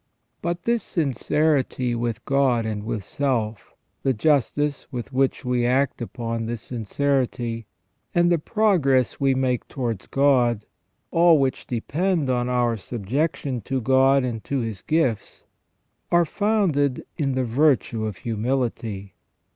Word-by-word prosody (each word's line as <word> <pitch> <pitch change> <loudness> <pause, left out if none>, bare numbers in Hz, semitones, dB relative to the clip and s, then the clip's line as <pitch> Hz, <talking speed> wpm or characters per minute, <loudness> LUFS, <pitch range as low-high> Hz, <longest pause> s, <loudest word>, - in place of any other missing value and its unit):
But 170 0 -2
this 235 -1 +1
sincerity 140 -4 0
with 115 -1 -3
God 135 -4 +2
and 105 -2 -3
with 110 -2 -3
self, 115 -7 -2 0.3
the 135 - +1
justice 145 +3 +1
with 120 -5 -6
which 135 0 +1
we 125 -1 +1
act 130 +2 +1
upon 115 -1 -4
this 115 -1 -4
sincerity, 120 -1 -1 0.5
and 175 0 +4
the 170 - +3
progress 155 - +2
we 135 -1 +2
make 130 -2 0
towards 115 -7 -4
God, 125 -6 +2 0.5
all 170 -1 +6
which 135 -2 -1
depend 150 +5 0
on 125 0 0
our 120 -2 +1
subjection 125 - -2
to 135 +6 -2
God 135 +2 +4
and 115 -3 -3
to 140 -2 -1
His 110 -5 -4
gifts, 140 -9 -1 0.7
are 175 0 +5
founded 175 -10 +1
in 135 -3 0
the 130 - +1
virtue 120 -3 +2
of 105 -4 -5
humility. 115 -4 -2
130 Hz, 130 wpm, -24 LUFS, 115-145 Hz, 0.7 s, all